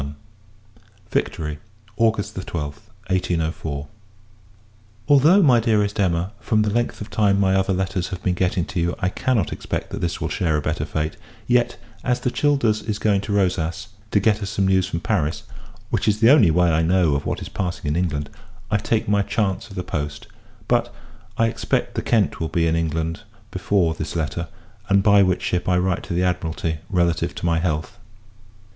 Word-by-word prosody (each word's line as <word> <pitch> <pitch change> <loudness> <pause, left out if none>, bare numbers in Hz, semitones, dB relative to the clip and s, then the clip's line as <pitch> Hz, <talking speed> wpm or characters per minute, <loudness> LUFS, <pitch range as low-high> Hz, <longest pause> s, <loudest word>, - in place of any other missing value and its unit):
LETTER 70 - -4
LI. 105 +3 -22
Victory, 75 -1 -2 0.4
August 110 -1 +1
12th, 90 +3 -5 0.2
1804. 80 -5 -2 1.2
Although, 155 +7 +6
my 125 -6 +6
Dearest 105 -3 +1
Emma, 90 -1 +1
from 110 -2 +1
the 105 - 0
length 120 +1 -1
of 105 - -7
time 100 -2 +2
my 95 -1 +3
other 95 0 +2
letters 95 -1 -1
have 95 0 -7
been 90 - +1
getting 90 0 0
to 100 -3 -4
you, 85 +1 0
I 90 - 0
cannot 115 - 0
expect - - -4
that - - -5
this 85 +1 -2
will - - -2
share 85 -6 0
a - - +1
better - - -1
fate; 80 0 -3 0.3
yet, 120 +1 +2 0.3
as 125 0 +1
the 125 - 0
Childers 125 -8 +2
is 105 0 -3
going 105 -2 +2
to 100 - -5
Rosas, 95 -1 0 0.2
to 100 - +3
get 105 +1 +2
us 100 - -3
some 95 -1 0
news 95 -1 +3
from 85 -3 -3
Paris 80 +6 -1 0.5
which 110 -3 0
is 105 0 +2
the 115 +3 +6
only 130 - +6
way 85 +1 +3
I 80 0 +2
know 85 -2 +3
of 70 0 -2
what - - -2
is - - -7
passing 90 -4 -4
in 75 - 0
England 75 -5 -1 0.4
I 105 - +4
take 110 +2 -1
my 100 0 +3
chance 100 -1 -1
of 95 - -11
the 90 - -3
post: 75 -4 -4 0.4
but, - - +1 0.5
I 115 - +3
expect 115 0 -1
the - - -2
Kent 110 -5 +1
will 80 - -2
be 85 0 +1
in 80 0 +2
England 80 0 -1 0.3
before 90 -5 +1
this 80 0 -5
letter; 80 +1 -2 0.4
and 100 0 +4
by 100 -1 +6
which 95 -2 +2
ship 90 0 -1
I 90 - +3
write 90 -1 0
to 85 - -4
the 90 - +1
Admiralty 80 -3 -1
relative 85 -4 +1
to - - -5
my 85 -1 +2
health. 80 +1 -2
95 Hz, 195 wpm, -22 LUFS, 85-105 Hz, 1.2 s, Although